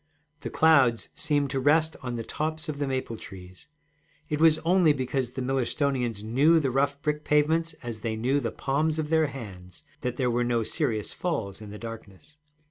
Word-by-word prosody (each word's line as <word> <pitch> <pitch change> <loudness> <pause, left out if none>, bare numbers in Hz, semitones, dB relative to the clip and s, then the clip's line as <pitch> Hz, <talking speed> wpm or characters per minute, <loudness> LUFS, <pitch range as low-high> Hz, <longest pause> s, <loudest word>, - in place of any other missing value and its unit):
The - - -5
clouds 135 -8 +4
seemed 145 -3 0
to 135 - 0
rest 155 +4 +3
on 125 -1 -4
the 115 - -4
tops 155 +5 -3
of 150 -2 -4
the 145 - -1
maple 130 -4 -3
trees; 95 0 -12 0.6
it 150 0 -1
was 160 -1 +6
only 175 -3 +5
because 130 -2 -2
the 130 - -3
Millerstonians 130 -3 -1
knew 140 +9 +4
the 135 -4 0
rough 140 +2 +1
brick 150 0 -1
pavements 160 +3 +2
as 115 -3 -6
they 110 -1 -2
knew 130 +6 +1
the 120 -4 -2
palms 150 +3 -1
of 155 -1 -2
their 160 -1 +4
hands 100 -4 -10 0.2
that 125 -2 -3
there 125 -2 +1
were 120 +1 +1
no 120 -1 +1
serious 110 -5 -2
falls 110 - -3
in 105 - -9
the 105 - -8
darkness. 115 +4 -10
135 Hz, 190 wpm, -27 LUFS, 115-150 Hz, 0.6 s, was